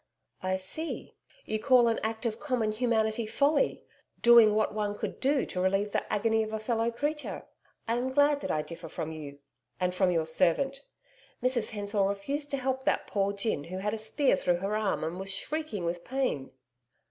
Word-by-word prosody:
'I 185 Hz, 0 st, 0 dB
see. 190 Hz, -, -4 dB, 0.3 s
You 215 Hz, -, -2 dB
call 245 Hz, 0 st, +5 dB
an 230 Hz, -, +1 dB
act 220 Hz, +2 st, -3 dB
of 225 Hz, -1 st, -1 dB
common 245 Hz, -7 st, 0 dB
humanity 220 Hz, -1 st, 0 dB
folly 290 Hz, -, +1 dB, 0.4 s
doing 235 Hz, -3 st, +7 dB
what 215 Hz, 0 st, +1 dB
one 205 Hz, -1 st, -2 dB
could -, -, -5 dB
to 270 Hz, -9 st, +1 dB
relieve 195 Hz, +2 st, +1 dB
the -, -, -2 dB
agony 225 Hz, +1 st, +2 dB
of 215 Hz, 0 st, -3 dB
a 220 Hz, -, -2 dB
fellow 225 Hz, +1 st, 0 dB
creature. 295 Hz, +6 st, -3 dB, 0.4 s
I 230 Hz, +1 st, +1 dB
am 250 Hz, +2 st, -1 dB
glad 285 Hz, +1 st, +3 dB
that -, -, -4 dB
I 155 Hz, -, 0 dB
differ 165 Hz, 0 st, -9 dB
from 160 Hz, -, -4 dB
you 145 Hz, -3 st, -8 dB, 0.4 s
and 180 Hz, 0 st, 0 dB
from 185 Hz, 0 st, +2 dB
your 165 Hz, -3 st, +1 dB
servant. 270 Hz, -, +1 dB, 0.6 s
Mrs 250 Hz, -3 st, +1 dB
Hensor 205 Hz, -1 st, -1 dB
refused 200 Hz, +10 st, -1 dB
to 275 Hz, -, -1 dB
help 265 Hz, 0 st, -2 dB
that -, -, +1 dB
poor 200 Hz, -1 st, 0 dB
gin 200 Hz, -7 st, -2 dB
who 185 Hz, +2 st, -6 dB
had 210 Hz, +2 st, -2 dB
a -, -, -1 dB
spear 220 Hz, +3 st, +3 dB
through 175 Hz, -1 st, +1 dB
her 195 Hz, +4 st, -2 dB
arm 210 Hz, -6 st, 0 dB
and 165 Hz, +3 st, -3 dB
was 195 Hz, +1 st, 0 dB
shrieking 225 Hz, -, -2 dB
with 170 Hz, +1 st, -3 dB
pain.' 255 Hz, -, -2 dB
215 Hz, 190 wpm, -29 LUFS, 190-255 Hz, 0.6 s, doing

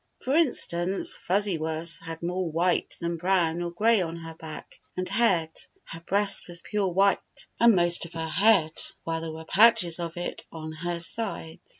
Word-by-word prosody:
For 260 Hz, -, -1 dB
instance. 195 Hz, -, +1 dB
Fuzzy 195 Hz, -1 st, 0 dB
Wuzz 160 Hz, +1 st, -1 dB
had 165 Hz, 0 st, -8 dB
more 180 Hz, 0 st, -2 dB
white 170 Hz, +3 st, 0 dB
than 170 Hz, 0 st, -2 dB
brown 175 Hz, -1 st, +1 dB
or 175 Hz, -, -2 dB
gray 215 Hz, +5 st, +3 dB
on 165 Hz, -1 st, -3 dB
her 165 Hz, -1 st, -8 dB
back 160 Hz, -1 st, -10 dB, 0.2 s
and 185 Hz, 0 st, -2 dB
head. 190 Hz, -6 st, +2 dB, 0.3 s
Her 165 Hz, -, -8 dB
breast 200 Hz, +4 st, +1 dB
was 170 Hz, -1 st, -4 dB
pure 205 Hz, -2 st, -1 dB
white, 195 Hz, +2 st, +3 dB, 0.4 s
and 235 Hz, -2 st, +6 dB
most 175 Hz, -1 st, +1 dB
of 170 Hz, -, -18 dB
her 165 Hz, -1 st, -4 dB
head, 190 Hz, -3 st, +3 dB, 0.3 s
while 165 Hz, 0 st, -2 dB
there 165 Hz, -1 st, -5 dB
were 160 Hz, 0 st, -9 dB
patches 205 Hz, -3 st, +5 dB
of 170 Hz, 0 st, -5 dB
it 175 Hz, -, -4 dB
on 155 Hz, -1 st, -7 dB
her 170 Hz, +2 st, -4 dB
sides. 170 Hz, -4 st, -4 dB
175 Hz, 180 wpm, -27 LUFS, 165-195 Hz, 0.4 s, and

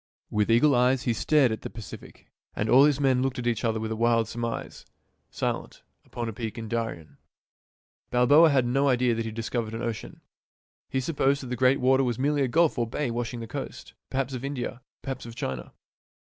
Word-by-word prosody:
"With 105 Hz, +1 st, +1 dB
eagle 120 Hz, +6 st, +5 dB
eyes 125 Hz, +1 st, +3 dB
He 120 Hz, -, +1 dB
stared 135 Hz, +1 st, +3 dB
at 110 Hz, -, -4 dB
the -, -, -6 dB
Pacific, 110 Hz, -5 st, -11 dB, 0.2 s
— -, -, -41 dB
and 105 Hz, -, -1 dB
all 135 Hz, +3 st, +8 dB
his 145 Hz, -2 st, +2 dB
men 130 Hz, -3 st, +3 dB
Looked 135 Hz, 0 st, -1 dB
at 125 Hz, -, -4 dB
each 120 Hz, 0 st, 0 dB
other 110 Hz, -1 st, 0 dB
with 110 Hz, 0 st, -4 dB
a -, -, -1 dB
wild 115 Hz, -1 st, +2 dB
surmise 115 Hz, 0 st, -5 dB, 0.2 s
— -, -, -46 dB
Silent, -, -, -4 dB, 0.2 s
upon 120 Hz, -1 st, -5 dB
a 115 Hz, -, -4 dB
peak 110 Hz, +1 st, -5 dB
in 115 Hz, -1 st, -5 dB
Darien." 110 Hz, -8 st, -4 dB, 0.9 s
Balboa 145 Hz, +7 st, +6 dB
had 135 Hz, -4 st, +3 dB
no 135 Hz, +4 st, +2 dB
idea 125 Hz, -2 st, +3 dB
that 115 Hz, -, -2 dB
he -, -, -3 dB
had 110 Hz, -, -6 dB
discovered 115 Hz, -1 st, -3 dB
an 115 Hz, -, -4 dB
ocean. 115 Hz, -2 st, -5 dB, 0.7 s
He 130 Hz, -, -1 dB
supposed 140 Hz, -1 st, +1 dB
that -, -, -7 dB
the 125 Hz, -, -2 dB
great 130 Hz, +2 st, +3 dB
water 130 Hz, +1 st, +3 dB
was 120 Hz, -3 st, -1 dB
merely 145 Hz, +2 st, +1 dB
a 135 Hz, -, +2 dB
gulf 160 Hz, +1 st, +2 dB
or 120 Hz, -, 0 dB
bay 125 Hz, +2 st, -2 dB
washing 120 Hz, 0 st, -3 dB
the 115 Hz, -, -6 dB
coast, -, -, -7 dB, 0.2 s
perhaps 135 Hz, 0 st, -2 dB
of 125 Hz, 0 st, -5 dB
India, 130 Hz, -2 st, -4 dB, 0.2 s
perhaps 135 Hz, -3 st, -5 dB
of 115 Hz, -, -9 dB
China. 65 Hz, -, -5 dB
120 Hz, 220 wpm, -27 LUFS, 115-135 Hz, 0.9 s, all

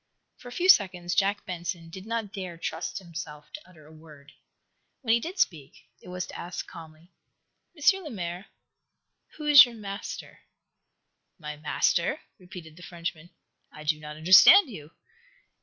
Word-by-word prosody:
For -, -, -13 dB
a -, -, -9 dB
few 350 Hz, +9 st, -1 dB
seconds 180 Hz, -, +4 dB
Jack 200 Hz, +3 st, 0 dB
Benson 170 Hz, -2 st, -6 dB
did 190 Hz, +4 st, -10 dB
not 225 Hz, -3 st, -4 dB
dare 185 Hz, -4 st, -7 dB
trust 165 Hz, -, -5 dB
himself 165 Hz, -5 st, -9 dB
to 300 Hz, -, -11 dB
utter 155 Hz, -4 st, -18 dB
a 155 Hz, -, -16 dB
word. 150 Hz, -2 st, -16 dB, 0.7 s
When 225 Hz, -2 st, +2 dB
he 235 Hz, -, +3 dB
did 345 Hz, -, -7 dB
speak, 150 Hz, -, -2 dB
it -, -, -16 dB
was 180 Hz, 0 st, -5 dB
to -, -, -12 dB
ask, 175 Hz, 0 st, -6 dB
calmly: 160 Hz, +1 st, -14 dB, 0.7 s
"M. 385 Hz, +6 st, +3 dB
Lemaire, 185 Hz, -, -6 dB, 0.9 s
who 300 Hz, -, -7 dB
is 295 Hz, -2 st, +10 dB
your 240 Hz, -2 st, -5 dB
master?" 200 Hz, -2 st, -8 dB, 1.0 s
"My 150 Hz, -3 st, -7 dB
master?" 170 Hz, -, 0 dB, 0.2 s
repeated 180 Hz, -4 st, -12 dB
the -, -, -13 dB
Frenchman. 170 Hz, -1 st, -7 dB, 0.4 s
"I 150 Hz, -, -12 dB
do 155 Hz, 0 st, 0 dB
not 150 Hz, 0 st, -9 dB
understand 190 Hz, -, +7 dB
you." 155 Hz, -7 st, -10 dB
180 Hz, 155 wpm, -27 LUFS, 160-215 Hz, 1.0 s, is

